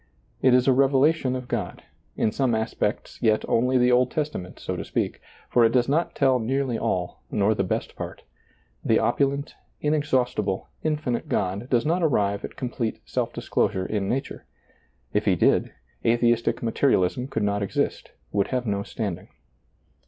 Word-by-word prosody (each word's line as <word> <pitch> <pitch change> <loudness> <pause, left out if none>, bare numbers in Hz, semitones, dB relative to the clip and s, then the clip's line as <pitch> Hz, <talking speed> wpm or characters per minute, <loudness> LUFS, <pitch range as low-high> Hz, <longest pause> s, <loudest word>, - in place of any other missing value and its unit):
It 130 -1 +5
is 125 +1 +3
a 135 - +6
revelation 135 +1 +3
of 130 -1 -5
God, - - -4 0.3
in 110 - +2
some 125 0 +1
aspects 110 0 -2
yet 110 -2 +2
only 125 +3 +2
the 125 0 +4
Old 125 +1 +4
Testament 150 - -4
so - - -4
to - - -4
speak, - - -2 0.3
for 120 - +3
it 115 - +5
does 125 -2 +3
not 155 +5 0
tell 130 -2 +3
nearly 130 +2 -1
all 90 -5 -2
nor 105 +1 +2
the 95 - 0
best 90 - -3
part. - - -7 0.6
The - - +3
opulent, 140 +1 0 0.3
inexhaustible, 125 -9 0
infinite 150 -6 -2
God 100 +6 -1
does 120 -2 +2
not 170 +4 +1
arrive 100 -10 +1
at - - -7
com 125 -2 -4
plete 115 -2 -2
self - - -2
disclosure 95 0 -1
in 100 -1 -2
nature; 135 +2 -3 0.7
if - - +1
He - - +4
did, - - +2 0.3
athe 115 +1 +2
istic 120 0 +2
materialism 115 -1 +1
could 115 -5 -2
not 100 0 0
exist, 100 - -2 0.2
would 100 -1 +1
have 125 -1 -2
no 100 -2 -1
standing. 100 -3 -4
125 Hz, 165 wpm, -25 LUFS, 105-135 Hz, 0.7 s, a